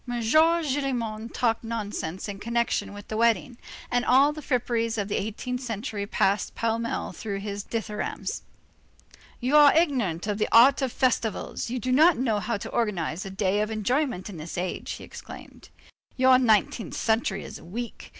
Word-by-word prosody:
Gillenormand 255 -3 +1
talked 230 -2 0
nonsense 205 -6 -4
in 200 -1 -6
connection 235 0 -1
with 205 0 -10
the 215 - -4
wedding, 235 +1 +1 0.3
and 245 0 +2
all 275 +4 +5
the 305 - -8
fripperies 235 -4 -1
of 205 -1 -2
the - - -1
eighteenth 245 +5 -4
century 220 -3 -4
passed 200 0 0
pell 230 0 0
mell 230 0 -3
through 205 -3 -5
his 200 0 -5
dithyrambs. 215 -2 -4 1.0
"You 255 +4 +1
are 295 0 +7
ignorant 240 - +1
of 210 0 -2
the - - 0
art 260 +5 +7
of 265 -2 0
festivals. 235 -3 -1
You 250 - -2
do 255 +1 -2
not 315 +6 +5
know 230 -4 +1
how 230 +1 -2
to - - -7
organize 190 -5 -1
a - - -5
day 195 +1 0
of 210 - -1
enjoyment 220 0 -1
in 200 -5 -8
this 160 +3 -7
age," 180 +1 -3
he - - -9
exclaimed. - - -11 0.5
"Your 260 0 +6
nineteenth 220 -2 +1
century 220 -3 0
is - - -9
weak. 230 +7 -7
230 Hz, 170 wpm, -26 LUFS, 205-255 Hz, 1.0 s, are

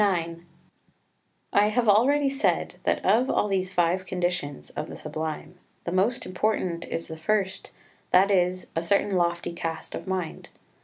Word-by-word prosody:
IX 170 -4 +1 1.1
I 205 +1 +5
have 230 +2 +1
already 270 +8 +5
said 275 +1 0
that - - +1
of 250 +4 +4
all - - +2
these 190 -2 0
five 180 +1 +1
conditions 175 - -2
of - - -5
the - - -7
Sublime 160 +3 -5 0.2
the 170 - -3
most 220 +7 +1
important 185 -3 -1
is 165 - -4
the 160 - -7
first, 195 +1 -1 0.4
that 195 +3 +5
is, 185 -1 +2
a 165 - +1
certain 200 +4 +2
lofty 170 -1 0
cast 165 -1 -5
of - - -6
mind. 185 -3 -3
185 Hz, 155 wpm, -26 LUFS, 170-205 Hz, 1.1 s, I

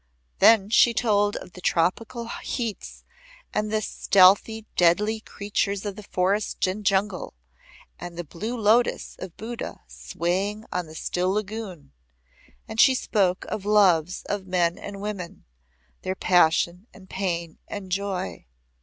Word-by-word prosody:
Then 215 -2 +6
she 235 0 +5
told 205 -3 +2
of - - -7
the 180 - -11
tropical 225 +8 0
heats 230 -2 -5 0.5
and 215 0 -1
the 215 0 0
stealthy 200 +4 +4
deadly 210 +6 +3
creatures 200 -1 -2
of 205 +1 -5
forest 195 +3 0
and 190 +3 -3
jungle, 195 - 0 0.6
and 175 -1 -8
the 175 - -3
blue 215 +10 -5
lotus 225 +2 +2
of 175 - -8
Buddha 230 +2 -6
swaying 195 +5 -3
on 180 -2 -2
the 155 - -12
still 180 +3 -1
lagoon, 205 -5 -4 0.8
And 220 0 -6
she 265 - +6
spoke 195 -7 0
of 215 -2 -4
loves 185 -5 +3
of 200 -2 -4
men 175 -2 +1
and 200 -1 -8
women, 200 -4 -6 0.6
their 185 0 -3
passion 180 +2 +2
and 190 -1 -15
pain 170 -4 -3
and 195 -2 -7
joy. 185 - -3
200 Hz, 135 wpm, -25 LUFS, 180-215 Hz, 0.8 s, Then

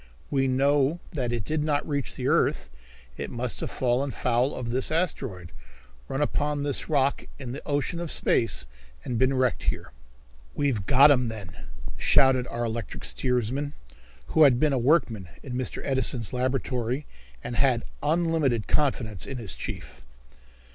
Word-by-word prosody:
We 135 -2 +2
know 140 +4 +2
that 125 -6 -1
it 120 -3 -2
did 155 +6 -1
not 150 -1 0
reach 140 -4 -2
the - - -3
earth. - - +1 0.5
It - - -4
must 120 0 -1
have - - -3
fallen 130 +2 0
foul 125 +1 0
of 120 -2 -4
this 130 +4 +1
asteroid, 130 - -1 0.6
run 135 +2 -1
upon 145 0 -1
this 145 -1 -1
rock 140 -2 +1
in 130 -4 -6
the 140 - -6
ocean 145 +3 -1
of 170 -2 -4
space 115 - +1 0.4
and 120 -2 -2
been 130 +1 +3
wrecked 130 -2 0
here." - - -2 0.6
"We've 125 -10 0
got 140 +3 +7
'em, 125 -3 +3
then," 105 -6 -7 0.4
shouted 130 - +4
our 120 0 -3
electric 115 -1 -4
steersman, 130 +3 0 0.6
who 160 - +2
had 135 -5 +7
been 150 -1 +3
a 130 - +1
workman 115 - +2
in 130 - -6
Mr. 125 0 -2
Edison's 130 -4 0
laboratory 125 +1 -1 0.4
and 120 - -4
had 125 -2 +2 0.2
unlimited 155 -8 +1
confidence 115 - 0
in 135 - -5
his 115 -6 -5
chief. - - -7
130 Hz, 155 wpm, -26 LUFS, 120-145 Hz, 0.6 s, got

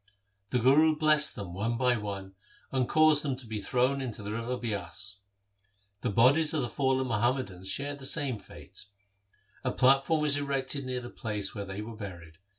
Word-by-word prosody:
The - - +1
Guru 145 +6 +5
blessed 150 -1 +3
them 95 -4 -7
one 115 +5 -1
by 125 0 +3
one, 100 -3 -5 0.4
and 130 -2 0
caused 155 -1 +5
them 140 -3 -1
to 130 0 -9
be 110 -2 -5
thrown 130 +5 +1
into 115 -5 -5
the 100 - -5
river 115 +3 -3
Bias. 100 -3 -2 0.8
The - - -1
bodies 140 +9 +4
of 150 - +1
the 120 - -3
fallen 130 +1 +1
Muhammadans 115 -5 -1
shared 140 +6 -2
the 135 - -2
same 135 -8 -1
fate. - - -12 0.8
A - - 0
platform 135 +4 +3
was 145 -1 +3
erected 140 -1 -1
near 125 -1 -2
the 120 - -9
place 105 -3 -3
where 100 -2 -5
they 95 +2 -6
were 115 +1 -8
buried. 85 -6 -9
125 Hz, 180 wpm, -29 LUFS, 105-140 Hz, 0.8 s, Guru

